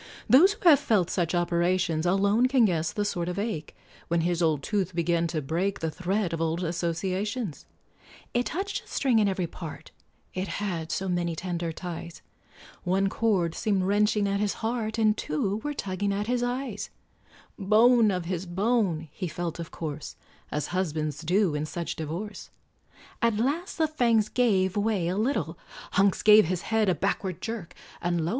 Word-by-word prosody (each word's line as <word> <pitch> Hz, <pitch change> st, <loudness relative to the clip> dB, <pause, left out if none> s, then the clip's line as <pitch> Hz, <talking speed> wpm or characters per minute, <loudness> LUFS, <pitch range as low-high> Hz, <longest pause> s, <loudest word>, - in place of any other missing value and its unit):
Those 360 Hz, +10 st, +7 dB
who 415 Hz, -3 st, -2 dB
have 295 Hz, -5 st, +8 dB
felt 215 Hz, -, +1 dB
such 175 Hz, -1 st, 0 dB
operations, 175 Hz, -1 st, +1 dB
Alone 200 Hz, +6 st, +3 dB
can 255 Hz, -3 st, +4 dB
guess 165 Hz, -5 st, 0 dB
the 205 Hz, -, -2 dB
sort 180 Hz, -4 st, -2 dB
of 180 Hz, -, -4 dB
ache, 200 Hz, -7 st, -3 dB, 0.3 s
When 170 Hz, 0 st, +1 dB
his 175 Hz, +1 st, 0 dB
old 155 Hz, -4 st, +2 dB
tooth 190 Hz, -4 st, -1 dB
began 170 Hz, 0 st, +1 dB
to 155 Hz, -2 st, -3 dB
break 175 Hz, +8 st, -1 dB
The 160 Hz, -1 st, -2 dB
thread 185 Hz, +1 st, -1 dB
of 165 Hz, -, -2 dB
old 165 Hz, +2 st, 0 dB
associations; 185 Hz, -, -2 dB, 0.7 s
It 245 Hz, +1 st, +1 dB
touched 395 Hz, +4 st, -3 dB
a -, -, -23 dB
string 255 Hz, -5 st, +2 dB
in 210 Hz, -, +3 dB
every 190 Hz, -2 st, 0 dB
part, 160 Hz, -2 st, -9 dB, 0.4 s
It 185 Hz, +1 st, -3 dB
had 175 Hz, -6 st, -3 dB
so 190 Hz, -, -2 dB
many 175 Hz, -2 st, -1 dB
tender 170 Hz, -1 st, -3 dB
ties; 170 Hz, 0 st, -7 dB, 0.6 s
One 190 Hz, +2 st, +1 dB
cord 190 Hz, -7 st, +1 dB
seemed 200 Hz, -2 st, 0 dB
wrenching 205 Hz, +1 st, +2 dB
at 200 Hz, 0 st, 0 dB
his 205 Hz, -1 st, 0 dB
heart, 225 Hz, -1 st, -1 dB
And 215 Hz, -1 st, +3 dB
two 195 Hz, +4 st, -1 dB
were 295 Hz, +5 st, -4 dB
tugging 200 Hz, -1 st, -2 dB
at 200 Hz, +1 st, -1 dB
his 245 Hz, +1 st, 0 dB
eyes; 245 Hz, -3 st, -3 dB, 0.7 s
"Bone 220 Hz, +3 st, +5 dB
of 180 Hz, -3 st, -1 dB
his 180 Hz, +1 st, -3 dB
bone," 190 Hz, -3 st, 0 dB
he 185 Hz, -, -4 dB
felt, 170 Hz, 0 st, -4 dB
of 165 Hz, -, -5 dB
course, 155 Hz, -2 st, -6 dB, 0.3 s
As 150 Hz, -, -2 dB
husbands 155 Hz, -5 st, -1 dB
do 180 Hz, +1 st, +2 dB
in 150 Hz, +1 st, -2 dB
such 170 Hz, +2 st, -4 dB
divorce; 170 Hz, +7 st, -6 dB, 0.7 s
At 230 Hz, -2 st, +2 dB
last 290 Hz, -, -1 dB
the 320 Hz, -1 st, +3 dB
fangs 235 Hz, -8 st, +2 dB
gave 195 Hz, -7 st, +2 dB
way 205 Hz, -4 st, +1 dB
a 180 Hz, -, -1 dB
little, 200 Hz, -, -1 dB, 0.3 s
Hunks 195 Hz, +1 st, +2 dB
gave 210 Hz, -1 st, +8 dB
his 175 Hz, +1 st, -2 dB
head 220 Hz, -2 st, +1 dB
a 180 Hz, -, +2 dB
backward 190 Hz, -2 st, -2 dB
jerk, 220 Hz, -4 st, -6 dB, 0.3 s
And 175 Hz, -2 st, 0 dB
lo! -, -, -1 dB
190 Hz, 175 wpm, -27 LUFS, 170-215 Hz, 0.7 s, have